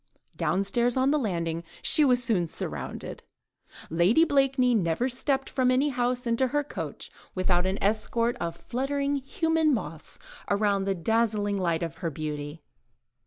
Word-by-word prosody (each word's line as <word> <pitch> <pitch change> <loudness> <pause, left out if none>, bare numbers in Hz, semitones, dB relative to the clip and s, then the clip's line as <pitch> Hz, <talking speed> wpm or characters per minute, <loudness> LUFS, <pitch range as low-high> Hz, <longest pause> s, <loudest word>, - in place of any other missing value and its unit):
Downstairs 235 +6 0
on 260 +2 +3
the 300 - +2
landing 170 - -2 0.2
she 305 - +6
was 250 -3 +4
soon 205 -9 +1
surrounded. - - -5 0.7
Lady 180 - +4
Blakeney 270 -4 +2
never 185 +2 +1
stepped 270 +1 0
from 255 -1 +1
any 260 +4 +3
house 250 -1 -1
into 235 +2 +1
her 290 +3 0
coach, 290 - -7 0.2
without 185 -1 +1
an 190 +1 -1
escort 230 +3 +1
of 170 -6 -3
fluttering 280 +3 -1
human 320 +1 +1
moths 165 -7 -5 0.3
around 200 -1 +1
the 195 0 0
dazzling 210 +1 0
light 170 -2 0
of 165 -3 -5
her 170 - -2
beauty. 150 0 -6
230 Hz, 145 wpm, -27 LUFS, 180-265 Hz, 0.7 s, she